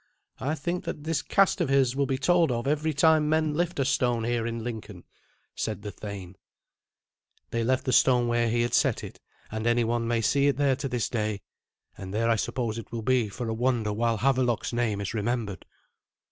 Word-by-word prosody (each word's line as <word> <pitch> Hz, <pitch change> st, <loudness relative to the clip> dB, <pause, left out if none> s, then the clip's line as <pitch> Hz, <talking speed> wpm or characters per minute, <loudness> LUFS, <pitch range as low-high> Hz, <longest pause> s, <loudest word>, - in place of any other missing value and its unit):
I 145 Hz, +4 st, -1 dB
think 175 Hz, +4 st, -3 dB
that 145 Hz, -, -5 dB
this 160 Hz, 0 st, -1 dB
cast 195 Hz, -1 st, +2 dB
of 160 Hz, -, 0 dB
his 135 Hz, -2 st, +3 dB
will 140 Hz, 0 st, +1 dB
be 135 Hz, -, 0 dB
told 170 Hz, +2 st, +3 dB
of 120 Hz, -1 st, -2 dB
every 150 Hz, +2 st, +1 dB
time 155 Hz, +1 st, +3 dB
men 155 Hz, -1 st, +2 dB
lift 175 Hz, +3 st, -1 dB
a 135 Hz, -, +1 dB
stone 125 Hz, -4 st, +1 dB
here 120 Hz, 0 st, -1 dB
in 115 Hz, -1 st, -4 dB
Lincoln," 110 Hz, -6 st, -7 dB, 0.5 s
said 105 Hz, -2 st, -4 dB
the 105 Hz, -, -5 dB
thane. 100 Hz, -3 st, -8 dB, 1.1 s
They 115 Hz, 0 st, 0 dB
left 130 Hz, +2 st, +1 dB
the 130 Hz, -, 0 dB
stone 125 Hz, -1 st, +4 dB
where 120 Hz, 0 st, +1 dB
he 120 Hz, +1 st, +1 dB
had 120 Hz, -, -2 dB
set -, -, +2 dB
it, -, -, -9 dB, 0.3 s
and 110 Hz, +1 st, -2 dB
any 120 Hz, 0 st, +3 dB
one 115 Hz, 0 st, -1 dB
may 115 Hz, -1 st, +1 dB
see 140 Hz, +6 st, +2 dB
it 140 Hz, -3 st, +1 dB
there 140 Hz, -2 st, +3 dB
to 135 Hz, -, -3 dB
this 125 Hz, -3 st, -1 dB
day, 105 Hz, -3 st, -2 dB, 0.5 s
and 95 Hz, -1 st, -8 dB
there 115 Hz, +1 st, +2 dB
I -, -, +4 dB
suppose 115 Hz, +1 st, -2 dB
it 115 Hz, -, -11 dB
will 115 Hz, -1 st, -4 dB
be 125 Hz, -3 st, +2 dB
for 120 Hz, +4 st, -5 dB
a 110 Hz, -, -1 dB
wonder 115 Hz, -2 st, 0 dB
while 115 Hz, +1 st, 0 dB
Havelok's 125 Hz, -1 st, +1 dB
name 115 Hz, -4 st, 0 dB
is 100 Hz, -, -4 dB
remembered. 110 Hz, -2 st, -2 dB
120 Hz, 210 wpm, -27 LUFS, 110-135 Hz, 1.1 s, stone